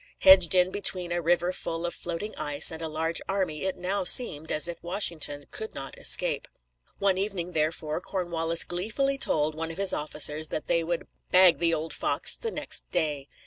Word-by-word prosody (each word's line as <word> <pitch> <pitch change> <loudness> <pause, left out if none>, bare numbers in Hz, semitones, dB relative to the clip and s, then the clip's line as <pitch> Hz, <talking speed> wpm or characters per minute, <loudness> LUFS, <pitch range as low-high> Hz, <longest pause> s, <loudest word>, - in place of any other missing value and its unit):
Hedged 190 -2 +7
in 180 0 +4
between 185 -3 +1
a 175 0 -1
river 175 +2 +1
full 165 -1 -5
of 175 - -3
floating 175 +5 -6
ice 145 0 +3
and 160 0 -8
a 165 - -3
large 160 +1 -2
army, 190 -5 -2
it 190 - -2
now 190 +2 -2
seemed 170 -6 +5
as 155 +2 +2
if 170 -1 -7
Washington 170 -5 -1
could 220 - -7
not 135 0 -6
escape. - - +1 0.5
One 195 -2 +1
evening, 190 -3 -3
therefore, 155 0 -2
Cornwallis 170 -3 -1
gleefully 225 +10 -2
told 155 - +1
one 165 +1 -5
of 165 - -8
his 195 -1 +2
officers 150 +1 -2
that 155 - -5
they 170 - 0
would 170 +1 -4 0.2
"bag 185 -1 +6
the 165 -1 +2
old 160 +1 -5
fox" - - +1
on - - -16
the 460 - -2
next - - -4
day. 150 -5 -2
170 Hz, 190 wpm, -26 LUFS, 155-185 Hz, 0.5 s, Hedged